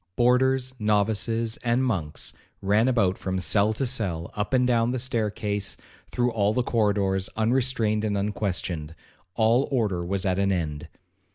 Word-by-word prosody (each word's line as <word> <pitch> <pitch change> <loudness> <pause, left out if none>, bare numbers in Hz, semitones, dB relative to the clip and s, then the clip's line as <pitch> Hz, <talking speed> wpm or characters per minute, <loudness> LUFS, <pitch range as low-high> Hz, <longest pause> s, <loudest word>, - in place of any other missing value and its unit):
Boarders, 130 +2 +2
novices, 110 +2 0
and 120 +2 0
monks, 90 -12 -3 0.3
ran 105 +5 +2
about 100 -8 +2
from 95 0 -2
cell 100 +3 +2
to 135 - -2
cell, 95 -10 -1
up 105 +2 -2
and 125 -1 +3
down 120 -2 +2
the 130 - -1
staircase, 105 -5 -2 0.3
through 125 0 0
all 105 -2 +1
the 125 - +1
corridors, 100 -5 +1
unrestrained 115 -2 +1
and 105 -2 0
unquestioned,—all 100 - -2
order 105 -10 0
was 95 +2 -2
at 95 0 +1
an 100 0 +2
end. 80 -4 -3
105 Hz, 145 wpm, -25 LUFS, 95-120 Hz, 0.3 s, and